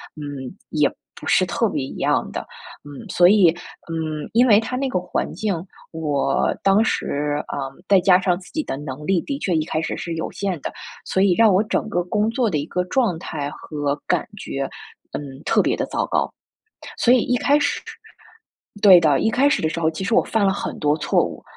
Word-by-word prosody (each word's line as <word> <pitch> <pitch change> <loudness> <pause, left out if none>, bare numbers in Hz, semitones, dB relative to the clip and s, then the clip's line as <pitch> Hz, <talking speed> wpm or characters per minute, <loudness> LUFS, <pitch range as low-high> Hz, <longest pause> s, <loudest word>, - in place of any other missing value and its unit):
嗯， 145 -4 -6 0.2
也 - - +2 0.3
不 - - -9
是 - - +4
特 - - 0
别 - - -2
一 - - -7
样 - - 0
的。 - - -5 0.4
嗯， 145 -2 -9
所 175 - +5
以， 195 -3 +6 0.4
嗯， 155 -2 -3
因 245 +2 +5
为 205 - +7
它 250 +3 -3
那 270 +1 -1
个 185 - 0
环 180 - -3
境， 215 -2 -1 0.4
我 145 -4 0
当 195 +2 +4
时， 145 -7 -1
呃， 135 -1 -3 0.2
再 195 -2 +6
加 180 0 +5
上 180 -2 +1
自 185 - -15
己 310 +1 -1
的 135 - -4
能 145 0 -7
力 190 0 +2
的 280 -1 -4
确 185 - -1
一 155 -2 +1
开 155 -1 -2
始 - - -3
是 170 -1 -4
有 160 - -4
限 190 -5 -3
的， - - -4 0.3
所 190 - 0
以 195 -2 +4
让 220 0 +5
我 190 - +4
整 220 0 -1
个 175 -3 0
工 210 +4 0
作 235 -2 +1
的 155 - 0
一 145 - -2
个 180 +1 -1
状 205 -6 0
态 145 -4 -4
和 145 -2 -4
感 180 -3 +1
觉， 135 -7 -4 0.5
嗯， - - -4 0.2
特 - - +3
别 - - +1
地 - - -2
糟 - - -1
糕。 - - -1 0.6
所 245 - +4
以 255 - +4
一 250 - +1
开 285 +4 +3
始 - - 0 1.0
对 190 -4 +9
的， 150 -5 +3
一 220 - +2
开 270 +5 +3
始 290 - +1
的 160 - +2
时 155 - -4
候 160 -1 +2
其 165 +4 -5
实 220 - 0
我 250 - +5
犯 210 -3 +1
了 195 - +3
很 195 - -5
多 150 0 +2
错 - - +2
误， - - -7
180 Hz, 235 characters per minute, -22 LUFS, 150-210 Hz, 1.0 s, 对